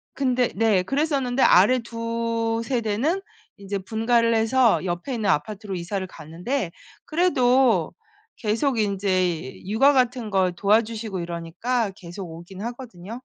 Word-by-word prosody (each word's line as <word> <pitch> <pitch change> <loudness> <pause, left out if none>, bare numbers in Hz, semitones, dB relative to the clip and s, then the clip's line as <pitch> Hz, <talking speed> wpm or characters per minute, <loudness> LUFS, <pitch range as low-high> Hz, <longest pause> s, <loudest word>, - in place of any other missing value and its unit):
근데 255 -3 +1
네 210 -3 +3
그랬었는데 270 - 0
아래 215 +7 +6
2 230 0 -2
세대는 245 - 0 0.4
인제 200 0 -4
분가를 230 +3 +1
해서 225 +1 +3
옆에 175 +9 -3
있는 215 -3 -1
아파트로 195 +5 -1
이사를 185 +2 -3
갔는데 175 - -4 0.3
그래도 265 -7 +3 0.4
계속 230 +4 0
인제 185 -7 -1
육아 270 +8 +4
같은 250 -3 +1
걸 190 -3 +1
도와주시고 215 +1 +1
이러니까 175 +7 -2
계속 175 +1 -8
오긴 175 +4 -10
하거든요. 235 -2 -7
225 Hz, 285 characters per minute, -24 LUFS, 190-245 Hz, 0.4 s, 아래